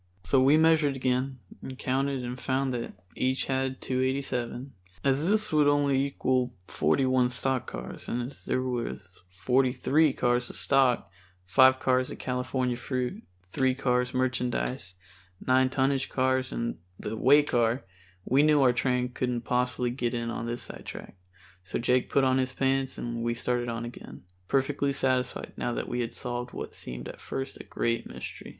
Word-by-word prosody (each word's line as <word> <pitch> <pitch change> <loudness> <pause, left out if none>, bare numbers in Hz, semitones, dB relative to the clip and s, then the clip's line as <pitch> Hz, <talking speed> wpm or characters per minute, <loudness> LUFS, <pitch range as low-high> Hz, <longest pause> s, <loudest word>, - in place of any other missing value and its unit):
So 135 - +3
we 140 +4 +6
measured 160 -3 +4
again 130 +1 0 0.2
and 130 -1 -7
counted 135 0 -1
and 125 +1 -5
found 130 0 0
they 120 -1 -3 0.2
each 130 +1 0
had 130 -1 -1
287. 130 0 -2 0.3
As 140 +4 +2
this 215 -4 +3
would 150 -1 +5
only 140 -2 +3
equal 130 -3 0
forty 135 - +2
one 130 -1 +3
stock 130 0 -1
cars, - - -7
and 120 +1 -1
as 130 +3 -8
there 130 - 0
was 125 -2 -2 0.3
forty 125 +8 +2
three 150 +3 +3
cars 125 -1 0
of - - -7
stock, 130 -9 +2 0.3
five 130 +6 +5
cars 130 -1 +2
of - - -7
California 125 0 -1
fruit, 125 0 -3 0.3
three 130 +6 +1
cars 125 -2 +1
merchandise, 125 -5 -1 0.4
nine 130 0 +3
tonnage 135 0 +1
cars 130 0 +1
and 115 -5 -3 0.2
the 110 - -4
way 140 +6 +5
car, 120 -2 +1 0.4
we 135 +3 +4
knew 150 0 +5
our 125 -2 +5
train 125 0 +1
couldn't 125 -1 -2
possibly 125 0 0
get 120 -1 -2
in 115 0 -2
on 115 - -4
this 120 +1 -3
sidetrack. - - -9 0.5
So 95 +3 -4
Jake 125 +1 +1
put 140 - +3
on 130 0 +3
his 130 0 -1
pants 135 0 0
and 120 -1 -4
we 120 0 0
started 120 0 -1
on 115 0 -3
again, 120 - -10 0.2
perfectly 140 +2 +1
satisfied 130 -1 -1
now 120 - -1
that - - -3
we 120 - -2
had 115 0 -3
solved 120 +1 -5
what - - -6
seemed 60 0 -8
at - - -10
first 135 0 -5
a - - -10
great 115 0 -2
mystery. - - -8
130 Hz, 170 wpm, -28 LUFS, 120-135 Hz, 0.5 s, we